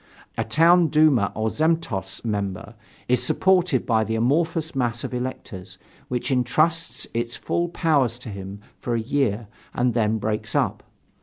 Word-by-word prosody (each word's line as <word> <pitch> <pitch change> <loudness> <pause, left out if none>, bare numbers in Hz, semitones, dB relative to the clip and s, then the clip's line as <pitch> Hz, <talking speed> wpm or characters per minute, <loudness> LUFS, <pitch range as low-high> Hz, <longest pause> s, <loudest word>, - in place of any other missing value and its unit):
A - - -1
town 170 +2 +4
duma 150 -9 +3
or 110 +1 0
zemstvo 140 - -1
member 105 +1 -3 0.3
is 125 0 +3
supported 180 -8 +2
by 110 -2 +2
the 110 +1 -2
amorphous 160 +7 0
mass 120 -3 -1
of - - -5
electors, 100 -7 -6 0.3
which 125 +2 -2
entrusts 155 +7 +1
its 115 0 -2
full 170 0 -1
powers 145 -9 +1
to 125 -2 -9
him 100 0 -8 0.2
for 120 - -2
a - - +1
year 115 -3 0 0.3
and 125 0 +1
then 110 -1 +1
breaks 110 0 -3
up. - - 0
120 Hz, 150 wpm, -23 LUFS, 110-155 Hz, 0.3 s, town